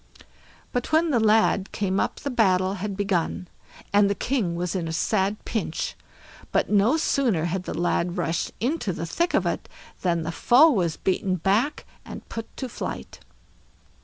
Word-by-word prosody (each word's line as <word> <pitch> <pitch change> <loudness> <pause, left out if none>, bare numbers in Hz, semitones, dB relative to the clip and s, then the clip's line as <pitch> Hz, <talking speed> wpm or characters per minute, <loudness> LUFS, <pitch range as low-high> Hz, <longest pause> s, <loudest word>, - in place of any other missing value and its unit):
But 245 +3 -2
when 320 +1 +3
the 245 - +3
lad 215 -2 +3
came 195 -1 -1
up - - 0
the 280 - -3
battle 190 -5 +2
had 200 -1 -3
begun, 185 -3 -1 0.5
and 205 0 +5
the 200 - 0
king 220 -10 -1
was 175 0 -2
in 175 -4 -2
a - - -3
sad 200 +4 0
pinch; 200 -8 -3 0.6
but - - +1
no 210 +8 +4
sooner 245 - +1
had 180 +2 -2
the - - -4
lad 175 0 0
rushed 170 -1 -1
into 245 - -1
the 165 - -4
thick 340 - 0
of - - +2
it - - -2 0.3
than 170 -3 +1
the 165 - -3
foe 265 - +5
was 175 - 0
beaten 185 0 0
back, 205 - 0 0.2
and - - -10
put 225 -1 -7
to 260 - -3
flight. 240 - -6
200 Hz, 170 wpm, -25 LUFS, 180-235 Hz, 0.6 s, and